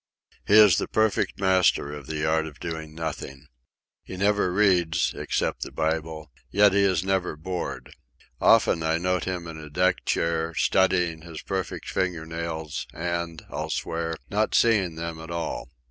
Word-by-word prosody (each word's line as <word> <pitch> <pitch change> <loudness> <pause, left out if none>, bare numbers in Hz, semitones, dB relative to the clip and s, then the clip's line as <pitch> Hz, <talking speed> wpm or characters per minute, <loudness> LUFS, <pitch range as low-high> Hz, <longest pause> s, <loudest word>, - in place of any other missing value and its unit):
He 105 - +5
is 105 -5 +8
the - - -2
perfect 110 -2 +1
master 95 -6 +2
of 75 -2 -9
the 80 -1 -2
art 80 0 +1
of 75 -2 -12
doing 80 -2 -6
nothing. 75 -3 -6 0.6
He 95 - -9
never 100 -1 +2
reads, 90 -4 +2
except - - -2
the - - -4
Bible; 80 -1 -2 0.2
yet 100 -1 +5
he 100 - +4
is 95 -4 +2
never 95 -4 0
bored. 75 -5 -5 0.5
Often, 80 - +4
I 80 0 +1
note 90 +1 0
him 90 -2 -3
in 80 -1 -8
a 75 -1 -9
deck 90 +4 +1
chair, 85 0 0
studying 90 -4 +2
his 80 -1 -9
perfect 95 -1 -4
finger 90 -4 -1
nails, 80 -2 -5
and, 85 -1 -3
I'll - - -4
swear, 80 0 -2
not 105 +2 0
seeing 100 -8 +3
them 85 0 -5
at 80 +1 -9
all. 85 0 -4
85 Hz, 160 wpm, -25 LUFS, 80-95 Hz, 0.6 s, is